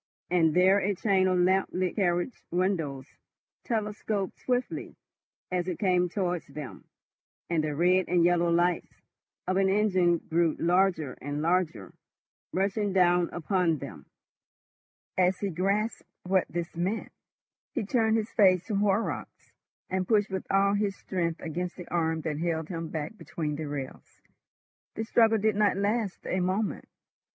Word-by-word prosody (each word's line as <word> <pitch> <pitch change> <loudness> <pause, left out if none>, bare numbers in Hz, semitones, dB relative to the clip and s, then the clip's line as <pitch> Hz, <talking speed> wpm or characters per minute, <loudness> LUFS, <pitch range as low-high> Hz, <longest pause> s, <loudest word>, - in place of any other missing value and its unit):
And 165 -3 +3
there 190 +2 +5
a 200 +1 0
chain 190 -1 +2
of 185 -1 +2
lamp 185 +2 +3
lit 185 -1 -1
carriage 175 +3 0
windows 165 -7 -1 0.6
telescoped 210 -3 -2
swiftly 250 0 -2 0.6
as 180 -1 -1
it 180 - -2
came 180 -2 +2
towards 180 -2 -2
them, 145 -1 -9 0.7
and 160 -2 +2
the 150 -1 -2
red 180 +3 +3
and 175 -1 +3
yellow 175 -1 +3
lights 175 +1 0 0.4
of 185 +1 0
an 195 0 +3
engine 185 -4 +3
grew 165 -1 0
larger 175 -5 +2
and 145 +2 -3
larger, 160 - 0 0.6
rushing 200 +1 0
down 175 -2 +3
upon 175 -1 +1
them. - - -9 1.1
As 180 0 +3
he 200 0 -2
grasped 200 +6 0 0.2
what 185 0 +2
this 170 0 -4
meant, 185 +6 -2 0.6
he 245 -7 -1
turned 225 0 +2
his 220 0 -3
face 185 -4 +4
to 210 - -2
Horrocks, 205 +2 -1 0.4
and 185 -1 -2
pushed 210 -3 +2
with 190 -1 -4
all 195 +1 +3
his 205 -1 0
strength 170 -3 -2
against 175 +2 -4
the 180 - -9
arm 160 -2 0
that 150 -1 -3
held 160 -2 -2
him 165 -3 -4
back 160 +8 -5
between 150 -3 -4
the 155 +1 -4
rails. 145 -2 -7 0.8
The 220 - -2
struggle 225 0 +4
did 215 0 +1
not 205 -2 +2
last 205 0 -1
a 185 - -1
moment. 190 +4 -1
185 Hz, 150 wpm, -28 LUFS, 170-200 Hz, 1.1 s, there